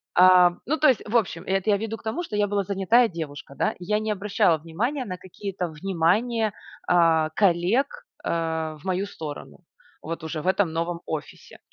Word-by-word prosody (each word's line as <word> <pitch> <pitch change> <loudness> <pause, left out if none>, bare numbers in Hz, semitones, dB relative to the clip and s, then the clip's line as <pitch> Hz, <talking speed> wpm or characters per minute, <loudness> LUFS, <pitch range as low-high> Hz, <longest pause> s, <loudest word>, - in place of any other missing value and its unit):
Ам, 180 -1 +6
ну 315 +4 0
то 305 - +4
есть, 255 - +2
в 230 - -3
общем, 185 -6 -1
это 195 +2 0
я 200 - +4
веду 225 +1 -4
к - - -19
тому, 225 +11 -2
что 215 - -6
я 205 0 +2
была 200 0 0
занятая 200 +5 +3
девушка, 150 -5 -7
да. - - 0
Я 210 +4 0
не 215 0 -2
обращала 195 -5 +2
внимание 230 - -3
на 180 -3 -5
какие-то 185 -1 -5
внимания, 195 +7 +1 0.4
а, 165 -3 +4
коллег, 200 +8 +3 0.4
а, 160 -1 -1
в 150 - -20
мою 190 +1 0
сторону 155 -1 -8 0.4
вот 165 0 -6
уже 155 -1 -4
в 180 - -6
этом 190 -3 +2
новом 170 +1 -2
офисе. 155 -2 -7
185 Hz, 185 wpm, -25 LUFS, 165-210 Hz, 0.4 s, Ам